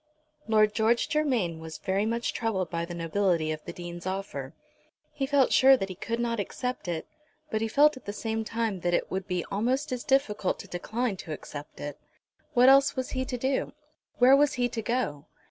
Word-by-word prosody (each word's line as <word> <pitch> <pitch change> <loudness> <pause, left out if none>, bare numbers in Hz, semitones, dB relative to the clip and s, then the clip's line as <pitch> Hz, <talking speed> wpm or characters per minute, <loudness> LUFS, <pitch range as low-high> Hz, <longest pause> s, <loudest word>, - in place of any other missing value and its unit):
Lord 215 -1 +4
George 225 +2 +2
Germain 245 - 0
was 160 -1 -8
very 195 +2 0
much 235 +1 -1
troubled 205 -6 -1
by 170 0 -1
the 175 0 -7
nobility 170 -1 +1
of 155 0 -5
the - - -5
Dean's 175 0 -7
offer. 170 -7 -4 0.6
He 270 - -2
felt 275 -2 +3
sure 265 0 +7
that 195 -5 -3
he - - -4
could 230 +5 -4
not 235 -1 -1
accept 250 +1 -4
it, 165 -2 -3 0.5
but 220 - 0
he 225 - +1
felt 295 +6 +5
at 260 - -13
the 205 - -3
same 220 +1 -3
time 225 -3 -2
that 175 0 +1
it - - -2
would 190 0 -3
be 180 -3 -2
almost 255 +8 0
as 250 -1 -3
difficult 265 -8 +1
to - - -10
decline 220 +4 -2
to 160 - -6
accept 145 0 -9
it. 145 -1 -6 0.6
What 245 +1 +6
else 275 +1 +6
was 260 -1 -3
he 260 0 -1
to 250 - -3
do? 265 +2 -1 0.4
where 255 +2 +7
was 290 0 +3
he 245 -1 +1
to 230 -1 -3
go? 215 - -2
220 Hz, 205 wpm, -28 LUFS, 175-250 Hz, 0.6 s, sure